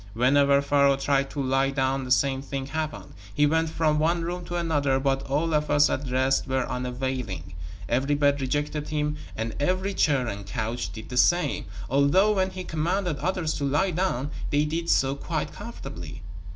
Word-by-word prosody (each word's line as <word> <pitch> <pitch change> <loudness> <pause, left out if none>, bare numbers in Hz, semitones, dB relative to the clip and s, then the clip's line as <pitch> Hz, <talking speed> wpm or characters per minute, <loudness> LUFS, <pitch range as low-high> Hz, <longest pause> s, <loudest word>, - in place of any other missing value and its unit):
Whenever 140 +3 +4
Pharaoh 140 -1 +3
tried 135 0 +1
to 140 - -3
lie 135 +1 +2
down 135 -1 0
the - - -7
same 135 +1 +2
thing 135 -1 -4
happened. 150 -7 -4 0.2
He 145 - +4
went 160 +2 +2
from 155 -1 +1
one 165 +2 +1
room 175 +1 -4
to 175 - -5
another, 145 -6 +1
but 135 0 +1
all 155 +4 0
efforts 150 -1 +3
at 135 0 -2
rest 130 +2 +1
were 130 -1 0
unavailing. 125 - -4 0.3
Every 135 +4 +1
bed 145 -1 +2
rejected 145 +3 -2
him 150 0 -1 0.2
and 110 0 -3
every 185 +6 0
chair 140 -8 +2
and 100 -3 -5
couch 115 +3 -3
did 110 -1 -9
the 125 - -4
same, 175 +7 +3 0.2
although 140 - +4
when 190 -2 +1
he 185 0 -6
commanded 170 0 -1
others 180 -4 -1
to - - -3
lie 150 +8 +1
down 155 -6 -1 0.2
they 145 +1 +2
did 165 +2 -3
so 135 0 +3
quite 140 - -3
comfortably. - - -8
140 Hz, 180 wpm, -26 LUFS, 130-160 Hz, 0.3 s, Whenever